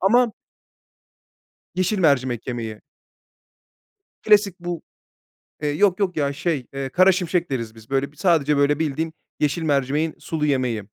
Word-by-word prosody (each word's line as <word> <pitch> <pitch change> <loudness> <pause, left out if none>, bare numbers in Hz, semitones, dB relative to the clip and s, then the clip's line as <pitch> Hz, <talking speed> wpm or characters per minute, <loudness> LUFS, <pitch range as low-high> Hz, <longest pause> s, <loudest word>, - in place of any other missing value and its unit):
Ama 235 +4 +4 1.4
Yeşil 185 +3 0
mercimek 130 -8 +2
yemeği. 115 -4 -4 1.4
Klasik 205 -4 +3
bu 175 -1 -4 0.8
Eee, 150 - +1
yok 185 +6 +2
yok 185 -5 0
ya, 140 -1 +1
şey, 150 -4 -2
eee, 135 -1 -3
karaşimşek 180 +1 +3
deriz 115 -4 -3
biz 110 +2 -16
böyle 135 +1 0
b - - -25
sadece 150 -4 +2
böyle 145 +1 +3
bildiğin 160 +1 -1 0.3
yeşil 150 +3 0
mercimeğin 145 +2 0
sulu 155 -2 -2
yemeği. 125 -6 0
150 Hz, 130 wpm, -23 LUFS, 135-180 Hz, 1.4 s, Ama